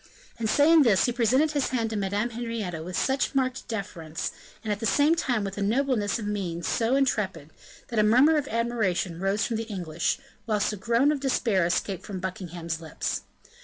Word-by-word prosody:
And 220 -2 -1
saying 310 +6 +6
this, 225 -8 +4
he 245 - +1
presented 255 +6 +2
his 285 -3 0
hand 230 -3 -1
to - - -3
Madame 205 +3 -1
Henrietta 225 -8 -4
with 180 +3 -5
such 270 +1 0
marked 260 -1 0
deference, 175 -7 -4 0.3
and 215 - -2
at 205 - -6
the 225 - 0
same 290 +7 +4
time 245 -9 0
with 195 0 -4
a - - -2
nobleness 230 0 +1
of 220 - -5
mien 185 -5 -3
so 230 +8 +1
intrepid, 190 - 0 0.4
that 230 - 0
a - - +5
murmur 255 +9 +5
of 290 -2 0
admiration 220 -8 -1
rose 195 +2 +1
from 230 - -2
the 225 0 -4
English, 175 -5 -1 0.3
whilst 210 -1 +1
a - - -3
groan 235 +8 +2
of 300 - -1
despair 230 -9 +1
escaped 185 +1 -1
from 195 -3 -6
Buckingham's 175 -3 -5
lips. 160 -1 -3
220 Hz, 195 wpm, -26 LUFS, 190-250 Hz, 0.4 s, saying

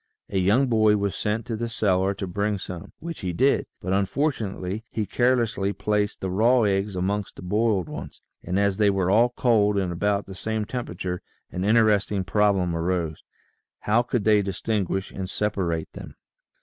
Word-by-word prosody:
A 95 - +1
young 105 +9 +3
boy 110 -4 +3
was 100 -1 -1
sent 105 +2 -2
to 115 - -3
the 120 +1 -3
cellar 100 -3 +1
to 95 - -4
bring 100 +3 -1
some, 90 -2 -7
which 165 0 -7
he 90 -3 -3
did, 135 +11 +2
but 95 +1 -2
unfortunately 100 -2 -1
he 110 - -2
carelessly 115 -3 +1
placed 105 0 -1
the 95 - -2
raw 115 +5 +4
eggs 100 -1 0
amongst 100 +2 -2
the - - -10
boiled 105 -1 +1
ones, - - -8 0.2
and 90 +2 -2
as 100 -1 +1
they 105 -1 +4
were 95 -2 +1
all 115 +4 +5
cold 110 -4 +2
and 95 -3 0
about 100 +3 0
the 95 - -9
same 110 +2 -3
temperature 90 -7 -4 0.3
an 90 - -3
interesting 105 -2 +3
problem 95 -3 +2
arose: 85 -2 -2 0.6
How 110 +3 +3
could 120 -2 -2
they 105 0 +4
distinguish 95 -1 -2
and 95 -1 -5
separate 95 -6 -2
them? - - -10
100 Hz, 175 wpm, -25 LUFS, 95-110 Hz, 0.6 s, all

